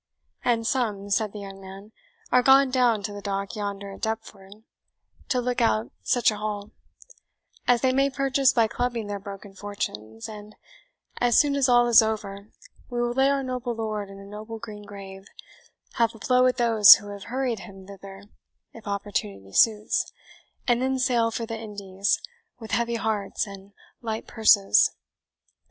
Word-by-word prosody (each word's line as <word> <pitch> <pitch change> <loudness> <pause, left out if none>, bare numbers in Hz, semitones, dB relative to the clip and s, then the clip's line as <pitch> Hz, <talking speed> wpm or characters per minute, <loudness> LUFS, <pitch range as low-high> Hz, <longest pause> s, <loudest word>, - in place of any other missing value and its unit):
"And 230 -2 +1
some," 210 -6 -1
said 210 +1 +1
the 210 - -8
young 195 -1 -9
man, 195 +2 -11 0.4
"are 250 - +5
gone 270 +1 +5
down 240 -5 +2
to 205 0 -4
the 205 - -7
Dock 200 +1 -3
yonder 200 -1 -5
at 195 - -12
Deptford, 215 -2 -6 0.7
to 255 - +1
look 245 0 -1
out 110 +2 +1
such 245 -1 +2
a 210 - -5
hull; 210 -1 -5 1.0
as 245 -2 +4
they 260 -1 +2
may 275 +1 +3
purchase 275 -1 +2
by 230 -3 +3
clubbing 240 -1 -2
their 205 0 -4
broken 200 0 -10
fortunes; 115 - -6
and 210 0 -10 0.6
as 240 -2 +3
soon 285 -1 +3
as 275 -2 +2
all 240 0 +5
is 235 -2 +7
over, 210 -2 -4 0.4
we 245 -1 -3
will 240 0 0
lay 265 +2 +3
our 280 -1 0
noble 250 -2 -3
lord 215 -3 -4
in 195 - -11
a 195 - -11
noble 215 +3 -8
green 215 -2 -9
grave, 195 -1 -10 0.7
have 230 0 +2
a - - -11
blow 250 +4 +3
at 255 - 0
those 225 -4 +8
who 205 -2 -9
have 200 -1 -8
hurried 245 -1 -2
him 195 -1 -12
thither, 195 0 -11 0.5
if 225 -2 -13
opportunity 105 - -4
suits, 215 -2 +2 0.6
and 240 0 +2
then 265 0 0
sail 240 -3 +2
for 230 0 -4
the 225 -1 -6
Indies 200 -2 -2 0.4
with 225 -2 -10
heavy 235 0 0
hearts 215 -3 -2
and 195 -1 -11 0.3
light 225 -2 -4
purses." 210 -1 +4
215 Hz, 170 wpm, -25 LUFS, 200-240 Hz, 1.0 s, those